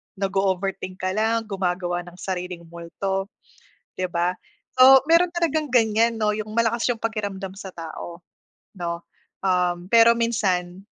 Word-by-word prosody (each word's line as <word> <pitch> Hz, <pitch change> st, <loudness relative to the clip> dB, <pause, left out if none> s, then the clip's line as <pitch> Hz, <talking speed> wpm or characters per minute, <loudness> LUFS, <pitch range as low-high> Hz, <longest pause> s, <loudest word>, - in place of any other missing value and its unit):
nag-o-overthink 195 Hz, -1 st, -2 dB
ka 185 Hz, -, 0 dB
lang, 225 Hz, +2 st, +1 dB
gumagawa 180 Hz, -2 st, -1 dB
ng 175 Hz, -, -12 dB
sariling 180 Hz, -2 st, -5 dB
multo, 180 Hz, +4 st, -4 dB, 0.7 s
di 185 Hz, -, -1 dB
ba? 175 Hz, +1 st, -1 dB, 0.4 s
So, 265 Hz, +1 st, +9 dB
meron 340 Hz, +1 st, +4 dB
talagang 315 Hz, -5 st, -1 dB
ganyan, 225 Hz, 0 st, +3 dB
no, 210 Hz, -, +2 dB
yung 215 Hz, 0 st, -3 dB
malakas 230 Hz, 0 st, +1 dB
yung 225 Hz, -, -15 dB
pakiramdam 200 Hz, -4 st, -4 dB
sa 190 Hz, -2 st, -8 dB
tao, 170 Hz, +1 st, -8 dB, 0.5 s
no? 170 Hz, -1 st, -3 dB, 0.4 s
Um, 180 Hz, -1 st, +1 dB
pero 230 Hz, +2 st, +7 dB
minsan, 195 Hz, -6 st, -1 dB
195 Hz, 130 wpm, -23 LUFS, 180-225 Hz, 0.7 s, So